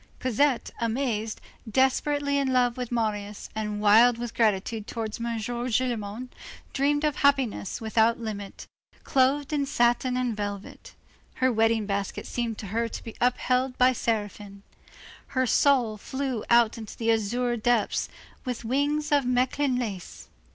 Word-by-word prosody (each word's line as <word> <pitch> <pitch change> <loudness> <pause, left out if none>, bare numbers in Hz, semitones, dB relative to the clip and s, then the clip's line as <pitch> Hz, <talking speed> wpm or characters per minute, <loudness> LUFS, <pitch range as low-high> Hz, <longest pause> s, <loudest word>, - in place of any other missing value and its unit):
Cosette, 255 +1 +1
amazed, 230 -2 -1 0.3
desperately 280 +3 +2
in 270 -1 0
love 245 -2 +2
with 250 -2 -5
Marius, 210 -3 -3
and 210 -1 -3
wild 225 +3 +6
with 240 -1 -5
gratitude 215 0 0
towards 220 -2 -4
M. 235 0 -2
Gillenormand, 240 0 -2 0.4
dreamed 290 +2 +1
of 300 -2 0
a - - -6
happiness 270 -8 +1
without 225 +1 +2
limit 205 -3 -6 0.4
clothed 275 +2 +2
in 285 -2 0
satin 245 -1 +2
and 250 -3 -1
velvet. 205 -1 -6 0.4
Her 260 0 +2
wedding 225 -1 +2
basket 200 -1 -3
seemed 235 -3 -3
to - - -7
her 230 +1 +1
to - - -7
be 225 - -9
upheld 250 +1 +1
by 255 +1 +5
seraphim. 205 -3 -3 0.7
Her 260 - +3
soul 245 -3 +3
flew 260 0 -3
out 235 -1 +4
into 220 -2 -9
the 230 -1 +1
azure 240 +3 0
depths, 235 -1 +1 0.3
with 250 -3 -4
wings 290 +5 0
of 285 -1 +4
Mechlin 255 +2 +1
lace. 205 -7 -6
235 Hz, 145 wpm, -26 LUFS, 220-260 Hz, 0.7 s, wild